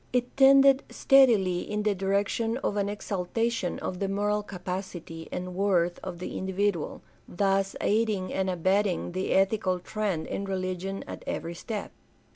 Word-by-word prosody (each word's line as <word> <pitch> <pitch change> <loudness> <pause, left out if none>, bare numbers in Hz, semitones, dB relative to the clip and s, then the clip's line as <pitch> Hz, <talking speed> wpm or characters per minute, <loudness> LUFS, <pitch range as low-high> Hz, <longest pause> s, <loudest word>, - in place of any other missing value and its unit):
It 250 -1 -1
tended 275 0 +7
steadily 225 -10 +4
in 210 +3 -3
the 210 -1 +2
direction 200 +4 0
of - - 0
an 200 -1 0
exalta 205 +2 -1
tion 190 -7 -2
of 180 - -4
the 195 - 0
moral 205 +1 0
capacity 180 -4 -6
and 180 0 -4
worth 180 -3 +1
of 185 -2 -5
the 180 - -5
individual, 190 -3 -1 0.2
thus 195 +1 0
aiding 210 -3 0
and 190 0 0
abetting 185 +1 +1
the 185 +2 -2
ethical 195 -1 +2
trend 190 -2 -2
in 200 - -4
religion 190 0 -3
at - - -8
every 170 +1 -3
step. 210 +4 -5
195 Hz, 150 wpm, -28 LUFS, 180-210 Hz, 0.2 s, tended